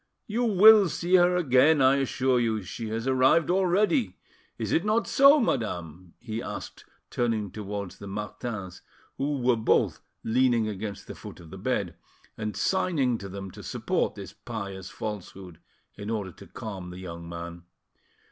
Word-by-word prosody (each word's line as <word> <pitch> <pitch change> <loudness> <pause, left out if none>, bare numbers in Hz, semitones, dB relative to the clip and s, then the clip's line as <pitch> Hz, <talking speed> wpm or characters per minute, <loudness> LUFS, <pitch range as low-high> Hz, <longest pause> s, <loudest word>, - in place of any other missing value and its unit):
You 235 +3 -1
will 210 -2 +7
see 175 +3 -3
her 180 0 +4
again, 150 -2 +4
I 135 +1 +5
assure 130 -1 +1
you; 110 -3 0
she 110 +4 -6
has 115 +2 -3
arrived 130 +6 +3
already. 195 - +2 0.4
Is - - -3
it 165 - +2
not 215 +2 +1
so, 275 +2 +6
madame?" 90 - -3
he 115 -1 -5
asked, - - -7 0.3
turning 110 -5 -1
towards 100 -2 -6
the 100 - -8
Martins, 105 -1 -6 0.4
who 145 +1 0
were 125 -1 +4
both 110 - +1 0.2
leaning 120 -1 +2
against 105 -1 -5
the - - -8
foot - - -11
of 80 -2 -13
the - - -9
bed, - - -1 0.4
and 105 -2 -4
signing 140 - +1
to 100 - -7
them 95 0 -7
to - - -11
support - - -1
this - - -9
pious 100 -5 -7
falsehood, 95 -4 -7 0.3
in 100 +1 -7
order 105 -4 -3
to - - -14
calm 95 -5 -7
the 90 - -9
young 85 -2 -8
man. 85 0 -8
115 Hz, 160 wpm, -27 LUFS, 100-145 Hz, 0.4 s, will